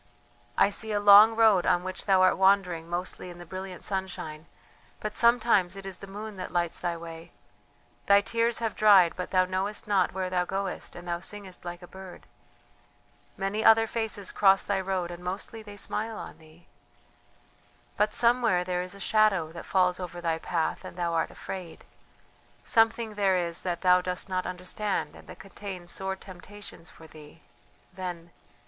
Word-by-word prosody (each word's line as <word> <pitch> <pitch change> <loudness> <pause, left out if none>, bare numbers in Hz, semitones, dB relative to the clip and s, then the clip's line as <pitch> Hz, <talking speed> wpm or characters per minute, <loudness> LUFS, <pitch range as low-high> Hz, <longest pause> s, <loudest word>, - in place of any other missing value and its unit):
I 200 - +4
see 220 +2 -2
a 205 - +1
long 205 +2 +8
road 220 -5 +4
on 175 - +3
which 185 +2 -5
thou 190 -1 +5
art 185 - +5
wandering 190 -4 +2
mostly 180 +1 -4
in 175 - -10
the 175 - -10
brilliant 185 +1 -7
sunshine, 180 -5 -4 0.5
but 210 0 -4
sometimes 230 -6 +3
it 195 0 -9
is 190 -1 -6
the 195 - -10
moon 210 +1 -8
that 185 - -5
lights 175 -1 -1
thy 175 -1 -2
way. 165 0 -10 0.8
Thy 200 0 +7
tears 230 +3 0
have 225 -2 -2
dried, 195 -5 +6
but 180 - -5
thou 185 -1 +3
knowest 190 +4 -3
not 195 -4 +2
where 190 0 -3
thou 180 -1 0
goest 195 +1 -4
and 175 0 -10
thou 170 0 -2
singest 190 -1 -6
like 175 +1 -7
a - - -10
bird. 190 0 -12 1.1
Many 195 +3 -2
other 225 0 +6
faces 220 -3 -3
cross 195 -1 +4
thy 195 -2 -1
road 185 -2 -2
and 175 0 -9
mostly 195 +5 -5
they 205 -1 -11
smile 220 +2 -3
on - - -9
thee.... 160 +2 -19 1.3
"But 210 +1 +2
somewhere 235 -6 +2
there 180 0 -2
is 180 +2 -7
a - - -12
shadow 195 -5 +2
that 170 - -9
falls 180 -1 +2
over 175 -1 -6
thy 165 -1 -1
path 165 -1 -2
and - - -10
thou 170 -1 -1
art 165 - 0
afraid 180 -3 -8 0.8
something 225 -1 +2
there 195 -3 +2
is 170 -1 -2
that 175 -2 -3
thou 180 -1 +5
dost 180 +1 -3
not 185 -1 -2
understand 185 +3 -3
and - - -15
that - - -10
contains 190 -3 -8
sore 190 0 -3
temptations 190 -1 -11
for 160 - -15
thee... 150 -1 -15 0.5
then.... 175 -2 -6
190 Hz, 180 wpm, -28 LUFS, 175-205 Hz, 1.3 s, long